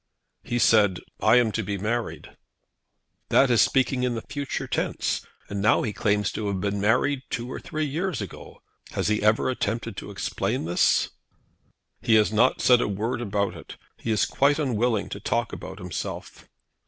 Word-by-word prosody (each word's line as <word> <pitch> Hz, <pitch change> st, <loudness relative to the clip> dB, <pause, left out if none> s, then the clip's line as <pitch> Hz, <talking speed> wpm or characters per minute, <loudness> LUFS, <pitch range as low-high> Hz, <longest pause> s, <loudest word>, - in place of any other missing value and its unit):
"He 120 Hz, -, -3 dB
said, 105 Hz, -5 st, +4 dB, 0.2 s
'I -, -, +5 dB
am 120 Hz, -3 st, +4 dB
to 110 Hz, -, -1 dB
be 100 Hz, -1 st, -3 dB
married.'" 115 Hz, +4 st, -3 dB, 0.9 s
"That 135 Hz, -1 st, +4 dB
is 115 Hz, -4 st, +5 dB
speaking 130 Hz, +4 st, +2 dB
in 125 Hz, -1 st, 0 dB
the 115 Hz, -, -5 dB
future 140 Hz, 0 st, -4 dB
tense; -, -, -1 dB, 0.2 s
and 100 Hz, -1 st, -4 dB
now 105 Hz, -, +3 dB
he 110 Hz, -, -2 dB
claims 105 Hz, -1 st, +1 dB
to 110 Hz, -, -3 dB
have 100 Hz, -2 st, -1 dB
been 100 Hz, +1 st, -1 dB
married 125 Hz, +6 st, +2 dB
two 120 Hz, +2 st, -4 dB
or -, -, -5 dB
three 155 Hz, 0 st, -3 dB
years 165 Hz, +4 st, -2 dB
ago. 100 Hz, -, -9 dB, 0.3 s
Has -, -, 0 dB
he 105 Hz, 0 st, +1 dB
ever 105 Hz, +1 st, +3 dB
attempted 115 Hz, -3 st, -2 dB
to -, -, -7 dB
explain 95 Hz, -4 st, -2 dB
this?" 85 Hz, +1 st, +2 dB, 0.9 s
"He 110 Hz, -, +3 dB
has 110 Hz, 0 st, +3 dB
not 120 Hz, +4 st, +3 dB
said 125 Hz, -1 st, +5 dB
a -, -, 0 dB
word 110 Hz, +4 st, -2 dB
about 100 Hz, -3 st, -1 dB
it. -, -, -11 dB, 0.2 s
He -, -, -5 dB
is 110 Hz, -2 st, +3 dB
quite 140 Hz, +1 st, +2 dB
unwilling 120 Hz, -6 st, 0 dB
to 100 Hz, -, -6 dB
talk 115 Hz, +3 st, -1 dB
about 95 Hz, -, -7 dB
himself." 90 Hz, -4 st, -6 dB
110 Hz, 180 wpm, -25 LUFS, 100-125 Hz, 0.9 s, I